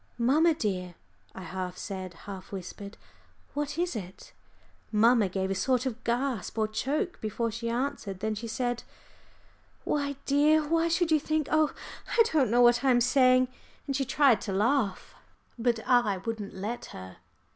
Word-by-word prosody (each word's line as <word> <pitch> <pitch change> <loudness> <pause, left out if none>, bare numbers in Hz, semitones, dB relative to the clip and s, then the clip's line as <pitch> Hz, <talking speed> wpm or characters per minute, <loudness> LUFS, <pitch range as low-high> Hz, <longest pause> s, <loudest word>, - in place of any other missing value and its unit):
"Mamma, 305 +7 +3
dear," 180 - -3 0.4
I 190 - -7
half 180 +1 -5
said, 185 -3 -6
half 195 -2 -8
whispered, 200 +2 -8 0.6
"what 295 +1 -3
is 350 -4 -1
it?" 190 -3 -8 0.6
Mamma 220 -1 +4
gave 190 +1 -2
a - - +2
sort 250 +6 +1
of 250 -2 -4
gasp 235 -3 -2
or 215 -1 +2
choke 300 - -2
before 225 +2 -2
she 230 +1 -4
answered. 235 -6 -3
Then 220 +2 -1
she 225 +2 -5
said, 245 +1 -2 1.0
"Why, 280 -1 -1
dear, 300 +2 +3
why 330 +1 +2
should 335 0 +1
you 310 - +5
think 310 0 -1
oh, 310 -1 +3 0.5
I 460 - +8
don't 280 -7 +3
know 240 +2 +4
what 240 +1 +5
I 270 - +3
am 245 -1 +5
saying," 255 0 +4 0.4
and 275 - -2
she 270 - +1
tried 265 -4 +3
to 200 - -4
laugh. 210 +1 0 0.5
But 230 -1 0
I 240 -6 +3
wouldn't 210 0 -5
let 210 +6 -4
her. 95 0 -10
240 Hz, 165 wpm, -28 LUFS, 200-280 Hz, 1.0 s, I